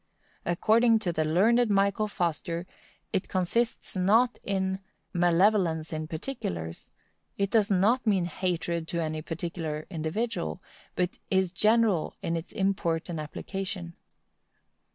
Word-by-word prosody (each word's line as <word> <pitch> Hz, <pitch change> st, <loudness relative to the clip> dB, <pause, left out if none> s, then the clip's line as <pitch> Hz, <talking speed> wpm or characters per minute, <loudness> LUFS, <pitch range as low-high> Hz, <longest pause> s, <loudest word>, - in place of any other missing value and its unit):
According 225 Hz, +6 st, +4 dB
to 175 Hz, -5 st, -1 dB
the 160 Hz, -, +1 dB
learned 215 Hz, +10 st, +3 dB
Michael 200 Hz, +1 st, +2 dB
Foster, 170 Hz, -3 st, -2 dB, 0.5 s
it 185 Hz, -, 0 dB
consists 215 Hz, +6 st, 0 dB
not 220 Hz, +7 st, +3 dB
in 190 Hz, -1 st, -1 dB, 0.3 s
"malevolence 175 Hz, -2 st, +3 dB
to 155 Hz, -1 st, -4 dB
particulars," 155 Hz, -, -5 dB, 0.5 s
it 200 Hz, 0 st, 0 dB
does 220 Hz, -2 st, +3 dB
not 215 Hz, +6 st, +3 dB
mean 190 Hz, -4 st, +3 dB
hatred 170 Hz, -1 st, -2 dB
to 170 Hz, -1 st, -2 dB
any 155 Hz, -1 st, -2 dB
particular 165 Hz, -1 st, -4 dB
individual, 175 Hz, +4 st, -2 dB, 0.4 s
but 180 Hz, 0 st, -1 dB
is 190 Hz, -2 st, +2 dB
general 215 Hz, -3 st, +2 dB
in 165 Hz, -, 0 dB
its 165 Hz, +1 st, -5 dB
import 190 Hz, -5 st, 0 dB
and 165 Hz, -2 st, -3 dB
application. 180 Hz, +3 st, -4 dB
180 Hz, 120 wpm, -28 LUFS, 165-205 Hz, 0.5 s, According